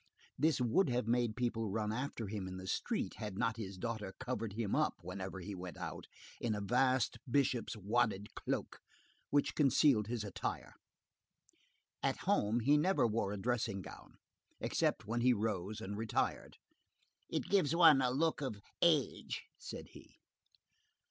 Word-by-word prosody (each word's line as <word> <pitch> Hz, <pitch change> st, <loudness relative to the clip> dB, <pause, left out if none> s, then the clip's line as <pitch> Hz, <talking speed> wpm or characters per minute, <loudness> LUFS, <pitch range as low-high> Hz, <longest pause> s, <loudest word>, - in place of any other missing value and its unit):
This 155 Hz, +2 st, +2 dB
would 125 Hz, +8 st, +3 dB
have 125 Hz, -1 st, 0 dB
made 120 Hz, -2 st, +2 dB
people 115 Hz, -3 st, -1 dB
run 105 Hz, +1 st, -1 dB
after 125 Hz, -1 st, -3 dB
him 100 Hz, -2 st, -4 dB
in 95 Hz, 0 st, -6 dB
the 95 Hz, -, -7 dB
street, -, -, -2 dB
had 105 Hz, -3 st, -5 dB
not 115 Hz, +2 st, 0 dB
his 100 Hz, -4 st, -6 dB
daughter 105 Hz, -3 st, -4 dB
covered 120 Hz, -5 st, -3 dB
him 105 Hz, -2 st, -1 dB
up, 155 Hz, 0 st, +2 dB
whenever 95 Hz, +1 st, -5 dB
he 100 Hz, +3 st, -6 dB
went 90 Hz, -3 st, -7 dB
out, -, -, -6 dB, 0.3 s
in 115 Hz, -3 st, 0 dB
a -, -, -2 dB
vast 125 Hz, +4 st, +2 dB
bishop's 125 Hz, -3 st, +1 dB
wadded 105 Hz, -1 st, 0 dB
cloak, -, -, -3 dB, 0.5 s
which 145 Hz, 0 st, +2 dB
concealed 135 Hz, -6 st, +4 dB
his 115 Hz, -2 st, -2 dB
attire. 100 Hz, -3 st, -4 dB, 1.3 s
At -, -, +1 dB
home, 110 Hz, +4 st, +2 dB
he 145 Hz, +6 st, +5 dB
never 185 Hz, -2 st, +3 dB
wore 110 Hz, -3 st, 0 dB
a 105 Hz, -, -3 dB
dressing 105 Hz, -3 st, -1 dB
gown, -, -, -12 dB, 0.4 s
except -, -, 0 dB
when 115 Hz, +3 st, -1 dB
he 125 Hz, +1 st, +5 dB
rose 105 Hz, -2 st, -2 dB
and 100 Hz, -2 st, -5 dB
retired. 110 Hz, +1 st, -1 dB, 0.7 s
"It -, -, -1 dB
gives 180 Hz, -6 st, +3 dB
one 165 Hz, -5 st, +8 dB
a 125 Hz, -, +3 dB
look 155 Hz, +5 st, +1 dB
of 120 Hz, -7 st, -3 dB, 0.2 s
age," 155 Hz, -6 st, +2 dB, 0.2 s
said -, -, -8 dB
he. -, -, -15 dB
115 Hz, 155 wpm, -35 LUFS, 105-130 Hz, 1.3 s, one